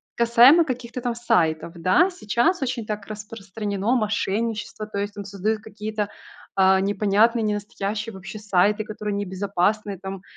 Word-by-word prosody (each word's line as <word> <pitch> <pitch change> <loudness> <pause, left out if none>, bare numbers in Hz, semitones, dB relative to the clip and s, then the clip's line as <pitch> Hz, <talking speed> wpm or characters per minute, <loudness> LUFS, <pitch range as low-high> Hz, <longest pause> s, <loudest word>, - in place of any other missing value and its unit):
касаемо 235 +8 +6
каких-то 250 -2 -4
там 240 -1 -1
сайтов, 170 -8 +1
да. 185 - +3
Сейчас 330 - 0
очень 245 -3 -2
так 210 -1 -4
распространено 210 +1 -3
мошенничество, 215 -1 -2
то 215 - -6
есть 205 +1 -2
тут 200 -1 -7
создают 205 +2 -1
какие-то, 215 -1 -4 0.5
а, 190 0 +5
непонятные 210 +3 +2
ненастоящие 210 +1 -3
вообще 195 +3 -8
сайты, 205 +1 +2
которые 210 -1 -5
небезопасные, 200 +1 -1
там 195 0 -7
210 Hz, 135 wpm, -23 LUFS, 200-225 Hz, 0.5 s, касаемо